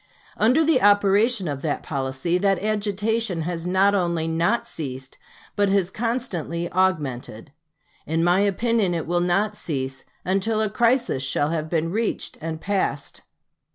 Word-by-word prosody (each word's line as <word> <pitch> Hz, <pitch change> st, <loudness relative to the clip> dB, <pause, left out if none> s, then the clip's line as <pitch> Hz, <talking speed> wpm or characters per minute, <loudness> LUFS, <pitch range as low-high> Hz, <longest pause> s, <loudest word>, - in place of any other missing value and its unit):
Under 255 Hz, +9 st, +3 dB
the 310 Hz, -5 st, +3 dB
operation 205 Hz, +1 st, +4 dB
of 140 Hz, -2 st, -3 dB
that 150 Hz, -1 st, -2 dB
policy, 135 Hz, +5 st, -1 dB
that 195 Hz, 0 st, +2 dB
agitation 210 Hz, -3 st, -1 dB
has 170 Hz, 0 st, -4 dB
not 190 Hz, +2 st, +3 dB
only 170 Hz, -4 st, 0 dB
not 175 Hz, +9 st, 0 dB
ceased, 130 Hz, -, -6 dB, 0.4 s
but 205 Hz, -1 st, +2 dB
has 195 Hz, -2 st, +1 dB
constantly 190 Hz, -, -3 dB
augmented. 145 Hz, -10 st, -1 dB, 0.6 s
In 165 Hz, +2 st, 0 dB
my 175 Hz, +2 st, +3 dB
opinion 205 Hz, -1 st, +1 dB
it 165 Hz, -, -2 dB
will 175 Hz, +1 st, 0 dB
not 200 Hz, +4 st, +1 dB
cease 135 Hz, -7 st, -4 dB, 0.2 s
until 195 Hz, +4 st, +1 dB
a 215 Hz, -2 st, 0 dB
crisis 240 Hz, -, +2 dB
shall 145 Hz, +2 st, 0 dB
have 160 Hz, -1 st, -2 dB
been 165 Hz, 0 st, 0 dB
reached 220 Hz, +3 st, -2 dB
and 160 Hz, 0 st, -4 dB
passed. 160 Hz, -7 st, -2 dB
185 Hz, 145 wpm, -23 LUFS, 160-210 Hz, 0.6 s, operation